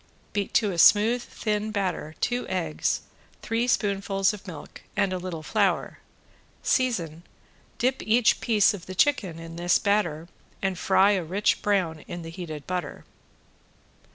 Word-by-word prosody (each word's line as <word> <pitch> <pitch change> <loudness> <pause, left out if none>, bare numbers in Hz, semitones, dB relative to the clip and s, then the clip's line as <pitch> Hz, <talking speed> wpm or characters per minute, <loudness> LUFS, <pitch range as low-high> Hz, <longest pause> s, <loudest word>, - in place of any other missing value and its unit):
Beat 200 -1 -2
to 210 -4 +3
a 170 - -3
smooth, 220 +7 +6
thin 215 -2 -3
batter 185 -7 -3
two 245 0 -1
eggs, 170 -5 -1 0.4
three 230 +1 0
spoonfuls 195 -2 +1
of 205 -1 -10
milk 165 -5 -9 0.2
and 190 -1 +2
a 185 - -2
little 175 -3 -6
flour, 195 0 0 0.6
season, 175 - 0 0.6
dip 255 +1 0
each 225 +1 +3
piece 215 -3 +4
of 185 -4 -9
the 185 - -7
chicken 190 - +2
in 165 0 -9
this 175 +1 +3
batter 175 -6 0 0.3
and 190 -2 -2
fry 195 +2 +4
a 190 -3 +1
rich 190 +6 0
brown 185 -6 0
in 175 -1 -6
the 165 - -7
heated 160 -4 -7
butter. 180 -1 -4
195 Hz, 150 wpm, -26 LUFS, 170-210 Hz, 0.6 s, smooth